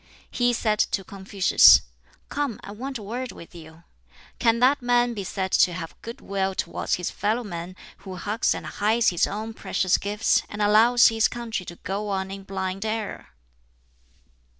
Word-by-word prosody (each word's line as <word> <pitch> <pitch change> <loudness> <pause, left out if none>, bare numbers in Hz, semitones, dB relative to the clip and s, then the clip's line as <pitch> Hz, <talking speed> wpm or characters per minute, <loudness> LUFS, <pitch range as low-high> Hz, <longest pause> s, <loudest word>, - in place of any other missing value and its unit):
He 245 0 +2
said 215 -3 0
to 195 - 0
Confucius, 195 0 +5 0.4
"Come, 285 -6 -3
I - - -8
want 260 +5 -6
a 215 - -10
word 240 +3 -5
with 170 - -13
you. 160 -1 -13 0.6
Can 230 -2 +3
that 260 +4 +3
man 245 0 +2
be 205 -3 -5
said 190 0 -3
to 180 - +4
have 165 -2 -6
good 230 +1 -9
will 195 -1 -2
towards - - -2
his 180 - -4
fellow 220 +4 -1
men 175 -3 -7 0.2
who 190 -2 -9
hugs 210 +6 -1
and - - -7
hides 220 +3 +1
his 175 -2 +1
own 215 +2 -5
precious 185 -4 0
gifts 210 +2 +1
and 205 - -8
allows 220 +4 +5
his 225 -1 +2
country 230 -6 -5
to 175 - -8
go 200 +4 -4
on 190 -1 -2
in 195 0 -8
blind 190 0 -4
error?" 220 -1 -4
205 Hz, 175 wpm, -24 LUFS, 190-230 Hz, 0.6 s, Confucius